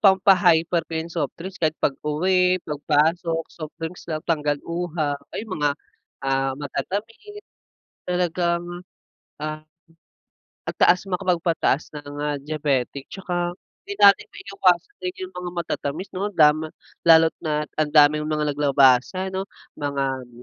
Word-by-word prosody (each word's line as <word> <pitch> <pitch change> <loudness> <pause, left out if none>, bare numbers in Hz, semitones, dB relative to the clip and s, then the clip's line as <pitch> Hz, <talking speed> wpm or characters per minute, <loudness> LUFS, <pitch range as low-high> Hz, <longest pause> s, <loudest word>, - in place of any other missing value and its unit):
pampa-hyper 185 -4 +4
ko - - -10
yung 165 +1 -4
softdrinks 175 +4 -5
kahit 160 -1 +1
pag-uwi, 180 +6 +2
pagpasok, 160 +3 +1
soft 155 -2 -8
drinks 165 +2 -6
lang, 155 -1 -2
tanggal 150 -3 0
uhaw, 170 -4 -2 0.2
ayun, 220 +1 -5
mga, 145 0 +3 0.5
ah, 135 0 +1
matatamis 220 - -5 0.7
talagang, 175 -1 0 0.8
ah, 155 0 -4 1.1
ang - - -4
taas 180 +1 +5
makapagpataas 170 -5 0
ng, 145 -1 -8
ah, 150 -1 -1
diabetic 140 -3 -2
tsaka 175 -2 -3 0.3
hindi 405 - -4
natin 200 -1 +7
maiiwasan 195 - 0
din 365 0 -3
yung 370 - -16
mga 180 0 -5
matatamis, 170 +1 -3
'no, 195 +2 -2
lama 155 0 +4 0.4
lalo't 160 0 +7
na 150 -1 -1 0.2
ang 155 - +2
daming 150 0 +4
mga 150 -1 0
naglabasan, 140 +6 +3
'no, 190 +1 -3 0.3
mga 135 -3 -2
160 Hz, 125 wpm, -23 LUFS, 150-180 Hz, 1.1 s, natin